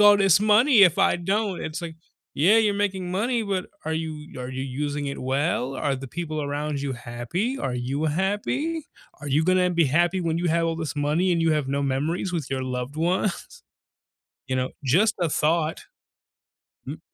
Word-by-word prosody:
all 205 0 +8
this 195 -2 +4
money 215 +3 +5
if 180 -3 +5
I - - +4
don't?" 195 +2 -1
It's 160 +3 -5
like, 165 -2 -6 0.4
"Yeah, 185 +10 +5
you're 210 -2 +2
making 190 -3 -1
money, 230 +5 0
but 195 -3 -2 0.2
are 160 - -2
you 155 -3 -5
are 125 - -5
you 130 0 -4
using 145 +2 -3
it 140 - -5
well? 135 0 -1
Are 140 -2 -1
the 135 0 -8
people 155 0 -4
around 145 0 -3
you 140 -1 -2
happy? 120 - -3
Are 125 -2 -2
you 130 +5 -2
happy? 210 - -1 0.3
Are 145 - -6
you 145 +3 +2
gonna 185 0 +3
be 170 -2 +3
happy 175 +6 +2
when 165 -1 -1
you 175 - -1
have 165 +1 +2
all 165 0 -1
this 160 -2 -4
money 150 +6 +1
and 170 -1 +1
you 165 -1 +3
have 150 -3 0
no 140 +1 0
memories 150 +7 -1
with 160 -7 -3
your 130 -1 -1
loved 125 +2 -4
ones? 180 +4 -1 0.8
You 130 - -1
know, 130 0 -1
just 195 - +3
a 175 -2 +1
thought." 160 +2 0 1.0
Mm - - -6
160 Hz, 195 wpm, -24 LUFS, 140-190 Hz, 1.0 s, all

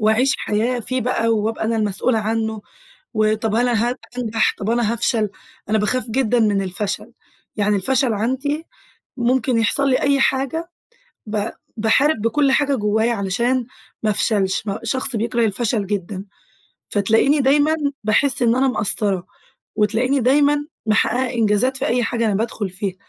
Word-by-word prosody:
وأعيش 220 +5 +3
حياة 235 +4 -1
فيه 255 +3 -2
بقى، 230 -1 0
وأبقى 220 0 0
أنا 225 +1 0
المسؤولة 220 +2 0
عنه، 220 0 -2 0.5
وطَب 215 0 +1
هل 245 +2 +2
هن 240 - +1 0.4
هانجح؟ 225 -3 +1
طَب 205 +2 -2
أنا 235 -1 +1
هافشل؟ 225 -2 0 0.4
أنا 220 - +2
باخاف 250 +5 0
جدًا 245 0 +1
من 205 -3 +2
الفشل، 195 +2 -4 0.4
يعني 205 0 +2
الفشل 255 +4 +1
عندي 265 +8 -1 0.5
ممكن 250 0 +1
يحصل 275 +5 +1
لي 255 - +2
أي 280 -1 +2
حاجة 270 +6 0 0.6
ب 210 0 -2 0.3
باحارب 225 +6 +2
بكُلّ 270 +5 +2
حاجة 285 0 +2
جوايا 220 +1 +1
علشان 235 +5 0 0.4
ما 215 - +2
أفشلش، 205 -1 0
م 195 - -1
شخص 260 +2 -1
بيكره 230 +1 0
الفشل 215 -1 -1
جدًا. 195 -1 -4 0.7
فتلاقيني 225 +8 +3
دايمًا 290 +4 +3 0.3
باحس 245 +5 +2
إن 235 +1 +3
أنا 265 +1 +3
مقصرة، 200 -5 -1 0.5
وتلاقيني 230 +6 +1
دايمًا 290 +3 +3 0.2
محققة 245 +4 +1
إنجازات 230 +3 +1
في 270 - -2
أي 245 0 +1
حاجة 230 0 0
أنا 210 - +1
بادخل 210 -1 -2
فيها، 190 0 -4
230 Hz, 150 wpm, -20 LUFS, 210-255 Hz, 0.7 s, وأعيش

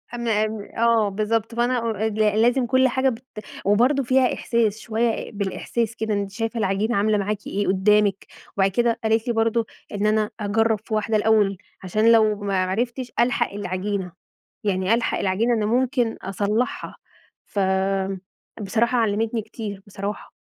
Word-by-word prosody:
امّا 225 -3 +1
ام 215 -1 -5 0.2
آه، 230 -2 +3
بالضبط 220 +3 -1
فأنا 245 +1 +1 0.3
أ - - +1
ل 215 0 +2
لازم 245 +2 +3
كل 260 +1 +3
حاجة 260 +1 +1
بت 240 +1 -6 0.4
وبرضه 250 +7 +3
فيها 255 +1 +3
إحساس 225 -3 0
شوية 225 0 -1
بالإحساس 215 +3 -2
كده، 220 -1 -2
أنتِ 200 -1 -2
شايفة 225 +2 -3
العجينة 210 +3 0
عاملة 210 +1 +2
معاكِ 205 +1 -3
إيه، 205 +1 -1
قدّامِك 200 +1 +2 0.3
وبعد 195 0 +3
كده 235 +2 +1
قالت 225 +2 +1
لي 240 - +1
برضه 225 0 +1 0.3
إن 205 +1 -1
أنا 215 0 +2
أجرّب 215 +1 +1
في 220 - -6
واحدة 215 0 +1
الأول، 210 -3 +3 0.3
عشان 215 +5 +3
لو 215 -2 +5
ما 195 -2 0
عرفتش، 240 +6 -2
ألحق 240 -1 +2
العجينة، 190 -1 -3 0.5
يعني 190 +1 +1
ألحق 235 0 0
العجينة 210 +5 +1
إن 220 -2 0
ممكن 245 0 +1
أصلّحها 205 +5 -2 0.5
ف 205 - -4 1.0
بصراحة 235 +5 +1
علّمتني 225 +1 0
كتير 205 -2 -7
بصراحة، 200 +1 -6
220 Hz, 150 wpm, -23 LUFS, 205-235 Hz, 1.0 s, لو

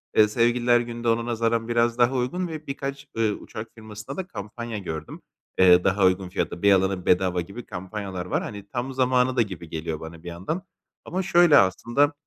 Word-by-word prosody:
Eee, 110 - +6
Sevgililer 120 +2 +3
Günü 120 0 -5
de - - -1
ona 115 +1 +1
nazaran 115 -1 0
biraz 120 0 +1
daha 125 +2 +3
uygun 175 +9 -1
ve 155 -2 -7
birkaç, 140 +1 -5
ııı, 110 -2 +2
uçak 110 +2 -8
firmasında 110 +3 -9
da 185 - -4
kampanya 115 - -6
gördüm. 80 -6 -6 0.4
Eee, 90 -1 +7
daha 95 0 +3
uygun 95 0 +2
fiyata, 90 -1 -3
1 100 - +5
alana 95 -1 +2
1 - - -18
bedava 90 -1 +2
gibi 100 +8 -9
kampanyalar 95 -1 -6
var. 90 - -1
Hani, 100 -1 -7
tam 130 +3 -4
zamanı 130 0 +2
da 125 - +4
gibi 95 -6 -5
geliyor 80 -1 -4
bana 80 0 -10
bir - - -10
yandan 95 - -4 0.4
ama 185 +2 -2
şöyle 175 -4 +6
aslında. 120 - +3
115 Hz, 195 wpm, -25 LUFS, 95-125 Hz, 0.4 s, Eee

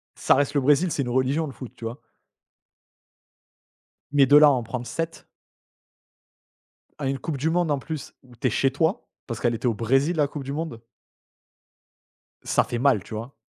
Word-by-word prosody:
ça - - +3
reste 145 +1 +1
le 140 - +3
Brésil. 150 +6 +3
C'est 140 - -1
une 120 - -4
religion 130 +5 +1
le 135 - -8
foot, 130 - -9
tu 115 - -9
vois? 115 +4 -6 2.1
Mais 140 -2 +5
de 145 - +5
là 150 0 +8
en 125 -3 0
prendre 120 +2 -5
7. 165 0 -5 1.7
À 135 - -2
une 135 0 -1
coupe 145 +1 -4
du 155 +5 0
monde 170 -2 +1
en 140 - +1
plus 155 +2 -7
où 125 -2 -18
tu 130 - -1
es - - +2
chez 135 +4 +1
toi, 165 - 0 0.2
parce 115 -4 -5
qu'elle 120 +2 +1
était 120 +2 -2
au 115 - +2
Brésil 135 +9 +1
la 150 -2 +2
coupe 140 -1 -7
du 140 +1 -5
monde. 150 -7 -5 1.6
Ça - - +2
fait 120 - -4
mal, 130 -8 +3
tu - - -11
vois? 115 +5 -6
135 Hz, 190 wpm, -24 LUFS, 120-150 Hz, 2.1 s, là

